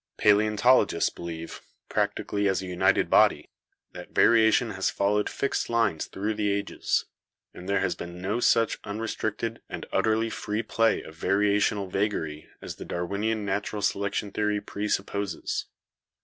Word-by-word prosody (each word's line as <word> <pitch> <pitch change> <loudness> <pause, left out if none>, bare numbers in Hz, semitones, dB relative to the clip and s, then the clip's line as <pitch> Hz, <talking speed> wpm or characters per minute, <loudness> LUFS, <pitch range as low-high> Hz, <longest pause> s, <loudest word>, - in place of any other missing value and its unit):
Paleontolo 105 +4 +4
gists - - 0
believe, 85 -1 -7 0.3
practically 100 0 -1
as 95 - +1
a 95 - -5
united 95 +2 +2
body, - - +3 0.4
that - - -11
variation 115 0 +4
has 95 -1 0
followed 105 +1 +1
fixed 140 - -2
lines 115 -9 +1
through 105 +3 -2
the 105 -1 0
ages; 100 0 -1 0.5
that 90 - -10
there 100 -1 +1
has 90 - +1
been 85 +1 -8
no 100 +6 -1
such 115 -2 +3
unrestricted 110 +1 -3
and - - -6
utterly 110 +1 +1
free 105 +1 -3
play 115 0 +1
of 80 - -11
varia 100 +5 +2
tional 100 -1 0
vagary 90 -6 -2
as - - -7
the - - -8
Darwinian 100 +5 -2
natural 100 +1 -2
selection 100 +1 -1
theory 105 0 0
presupposes. 100 -3 -3
105 Hz, 145 wpm, -27 LUFS, 95-110 Hz, 0.5 s, Paleontolo